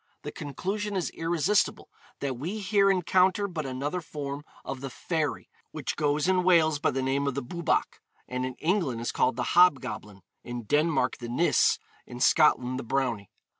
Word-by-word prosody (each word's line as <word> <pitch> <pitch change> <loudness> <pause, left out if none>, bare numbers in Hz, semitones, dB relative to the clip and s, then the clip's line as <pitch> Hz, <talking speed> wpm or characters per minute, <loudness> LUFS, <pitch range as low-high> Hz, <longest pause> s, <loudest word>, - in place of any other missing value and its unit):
The - - -5
conclusion 200 +9 -4
is 185 -3 -1
irresistible 170 +4 0 0.3
that 135 -2 -2
we 165 - -4
here 200 -1 +3
encounter 190 +1 +3
but 160 -6 -4
another 140 +7 -3
form 145 -2 -6 0.2
of 135 -1 -5
the 135 - -4
fairy 155 +2 -3 0.2
which - - -4
goes 150 +1 +1
in 185 -1 +3
Wales 160 -4 +4
by 155 - +2
the 135 0 -2
name 140 +2 0
of 140 - -1
the 140 - -2
Bwbach, 170 +6 -1 0.3
and 125 0 -3
in 130 -1 -4
England 160 - 0
is 120 - -2
called - - +1
the 125 - -2
Hobgoblin, 130 - +2 0.2
in 120 -1 -6
Denmark 145 0 +1
the 120 -1 -6
Nis, 145 +9 +3 0.3
in 120 - -9
Scotland 130 -3 +3
the - - -5
Brownie. 120 -5 -1
145 Hz, 170 wpm, -27 LUFS, 130-180 Hz, 0.3 s, Wales